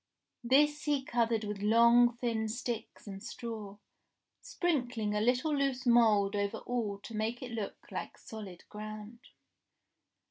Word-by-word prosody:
This 295 +4 +3
he 285 -3 +1
covered 230 -2 +1
with 205 -1 -4
long 235 +2 +5
thin 230 -2 -1
sticks 235 0 -5
and 195 -2 -7
straw, 220 -5 -6 0.6
sprinkling 245 -11 -1
a 210 - +1
little 255 +7 +2
loose 275 -2 0
mould 220 -4 +4
over 200 +2 -1
all 220 -4 -2
to 230 - -8
make 220 +4 -2
it 250 - -6
look 220 -3 -4
like - - -5
solid 205 -5 -10
ground. 215 +2 -8
230 Hz, 135 wpm, -32 LUFS, 210-245 Hz, 0.6 s, long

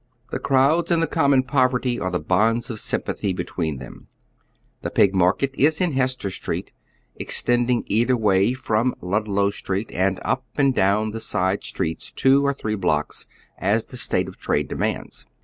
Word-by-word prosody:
The - - -2
crowds 140 +5 +2
and 170 -2 +3
the 165 - +2
common 140 -3 +3
poverty 130 -2 +1
are 95 - -1
the 90 -1 -1
bonds 110 +9 +1
of 110 - -5
sympathy 100 -1 -2
between 85 -4 -3
them. 65 -1 -11 0.7
The - - -3
Pig 100 - +3
mar 90 -1 +4
ket 135 +6 -2
is 150 +3 +2
in 180 -3 +1
Hester 130 -6 -1
Street, - - -4 0.5
extending 120 0 0
either 120 +4 +2
way 105 +1 +3
from 120 0 0
Lud 105 +4 -1
low 100 0 +1
Street, 100 +1 -3
and 95 +1 +1
up 130 - 0
and 140 -2 +3
down 105 +1 +2
the 115 - -5
side 95 -2 -1
streets 80 - -4
two 135 +1 +3
or 140 - +2
three 110 -5 -3
blocks, 90 -7 -1 0.3
as 105 +4 +1
the - - -11
state - - 0
of - - -10
trade - - 0
demands. - - -3
110 Hz, 175 wpm, -23 LUFS, 95-130 Hz, 0.7 s, mar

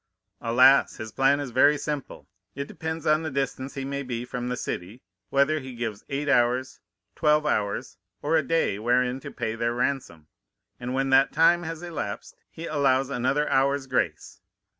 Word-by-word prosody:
"Alas! 130 +4 +5
his 110 0 -7
plan 135 +4 +3
is 140 -4 -5
very 145 +4 +5
simple. 145 -7 -5 0.3
It 140 +1 -4
depends 160 0 -5
on 155 +1 +3
the 160 - -3
distance 135 -1 -3
he 135 -1 -4
may 140 +1 -3
be 125 -3 -4
from 125 0 -5
the 125 0 -2
city, 100 +6 -5 0.3
whether 140 +3 +2
he 130 -3 -9
gives 115 -4 -5
eight 140 +1 -2
hours, 125 0 +2 0.4
twelve 150 -1 +3
hours, 100 -8 -1 0.3
or 155 +3 +1
a 160 - +4
day 155 -8 0
wherein 125 +3 +1
to - - -8
pay 115 -3 -3
their 115 +1 -1
ransom; 125 - -2 0.5
and 125 +2 -4
when 135 0 0
that 135 +1 +5
time 165 +3 +4
has 165 0 -6
elapsed 155 -12 -5
he 165 - -8
allows 135 -3 +1
another 140 +4 0
hour's 135 +1 +2
grace. 95 -12 -2
135 Hz, 175 wpm, -26 LUFS, 125-145 Hz, 0.5 s, Alas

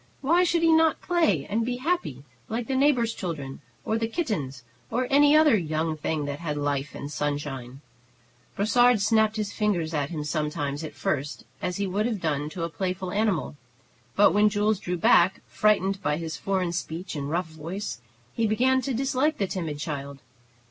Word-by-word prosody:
Why 335 +6 +4
should 340 -1 +1
he 330 -1 +5
not 320 -1 +4
play 265 - +2
and 220 +3 -1
be 245 +2 -2
happy, 250 - -2 0.3
like 230 +1 -2
the 265 - -2
neighbor's 260 -4 +3
children 150 -11 -5 0.2
or 220 +1 0
the 225 - 0
kittens 170 - -3 0.3
or 250 +3 0
any 290 +1 +6
other 310 -5 +6
young 160 -3 -1
thing 155 -1 -2
that 145 0 -4
had 150 -3 -3
life 145 -1 -2
and 140 - -6
sunshine? 145 -3 -4 0.7
Brossard 240 +3 +4
snapped 220 +1 +3
his 210 -2 -3
fingers 180 -7 0
at 145 -2 -1
him 155 -3 -4
sometimes 150 -1 -2
at 150 -2 -7
first, 140 +1 -3 0.2
as 180 -1 -2
he 200 - -1
would 200 +4 0
have 225 -4 -2
done 150 -3 -1
to 165 +2 -5
a - - 0
playful 185 +1 -3
animal; 200 -8 0 0.6
but 205 +1 +5
when 210 +1 +5
Jules 210 0 +1
drew 180 -1 -3
back, 175 +2 +4
frightened 195 -2 +1
by 150 -5 0
his 165 -1 -4
foreign 190 -3 -1
speech 170 +1 -5
and 140 -1 -3
rough 170 +1 -1
voice, 160 -1 -6 0.3
he 225 - +1
began 260 +5 +2
to 255 0 -2
dislike 270 +4 +1
the 200 - 0
timid 165 -6 -4
child. 140 -2 -5
185 Hz, 185 wpm, -26 LUFS, 150-225 Hz, 0.7 s, any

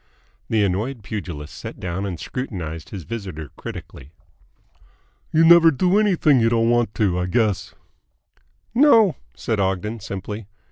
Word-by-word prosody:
The 110 -2 +2
annoyed 105 +6 -2
pugilist 85 -8 -6
sat - - -8
down 95 +2 -3
and 90 -4 -5
scrutinised 85 - -5
his 95 -4 -7
visitor 90 - -7
critically. 70 +3 -9 1.2
"You 160 +1 +4
never 170 0 +8
do 180 +7 +2
anything 175 -10 +3
you 115 0 +3
don't 115 0 +2
want 120 -3 +1
to, 95 -5 +1
I 90 - -1
guess?" 105 +1 0 1.0
"No," 230 - +5 0.2
said 110 -2 -2
Ogden 100 +4 -1
simply. 100 +1 -6
105 Hz, 135 wpm, -22 LUFS, 90-130 Hz, 1.2 s, never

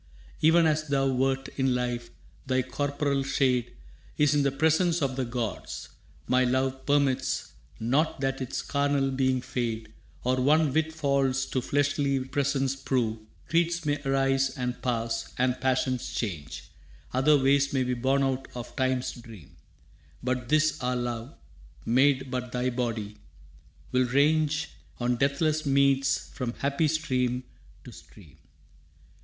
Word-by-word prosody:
Even 165 +2 +5
as 155 0 +1
thou 135 -1 +1
wert 135 +1 0
in 130 -2 +2
life, 120 -1 -2 0.4
thy 130 -1 +1
corporal 140 +1 -1
shade 130 -3 +1 0.5
Is 150 -1 +4
in 145 - +3
the 140 -1 +2
presence 160 +4 +2
of 135 -3 -1
the 130 -1 -1
gods. 120 -2 -4 0.4
My 130 0 +3
love 130 +1 0
Permits 140 -2 +1 0.3
not 135 +9 +1
that 135 0 -1
its 130 - -3
carnal 140 -1 +1
being 130 -1 +1
fade 115 -3 -3 0.3
Or 130 +1 +1
one 150 +1 +3
whit 160 +1 +1
false 140 -4 +1
to 130 - 0
fleshly 145 0 +1
presence 135 -1 0
prove. 120 -5 -1 0.3
Creeds 170 0 +1
may 145 0 0
arise 135 -1 +2
and 125 -1 -3
pass, 115 -2 -2
and 125 0 +1
passions 130 -1 0
change, 80 -9 -5 0.4
Other 140 +4 +4
ways 140 +1 +3
may 130 -2 +1
be 125 0 -1
born 135 +3 +1
out 135 0 -1
of 120 -1 -7
Time's 130 -1 0
dream, 115 - -13 0.7
But 125 -1 -2
this 155 +1 +2
our 125 0 0
love, 120 +1 -4 0.5
made 130 +2 +3
but 125 -1 -3
thy 125 +1 0
body, 115 -4 -3 0.8
'll 125 0 +3
range 150 +4 +2 0.3
On 120 0 +1
deathless 150 +4 +1
meads 135 -1 +2
from 120 -2 -3
happy 140 +3 0
stream 130 -5 0 0.4
to - - -11
stream. 75 -1 -16
135 Hz, 140 wpm, -27 LUFS, 125-140 Hz, 0.8 s, Even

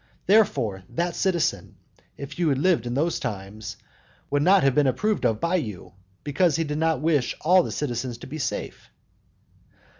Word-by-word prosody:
Therefore, 175 - +2
that 170 0 -2
citizen 185 -4 -1 0.4
if 140 +4 -8
you 170 -3 +2
had 135 - +1
lived 145 -6 +2
in 120 - -3
those 160 +4 0
times 105 -1 -6 0.5
would 145 0 +2
not 185 +4 +5
have 135 -1 +3
been 145 +1 +3
approved 210 +11 +1
of 110 -1 -1
by 170 +2 +1
you, 105 - -6 0.3
because 150 +2 +2
he 165 - +1
did 150 -1 -3
not 160 -4 +1
wish 150 -5 +1
all 180 +4 +5
the - - -4
citizens 120 -3 -3
to - - -11
be 155 +4 -7
safe. 115 - -4
150 Hz, 175 wpm, -25 LUFS, 120-170 Hz, 0.5 s, not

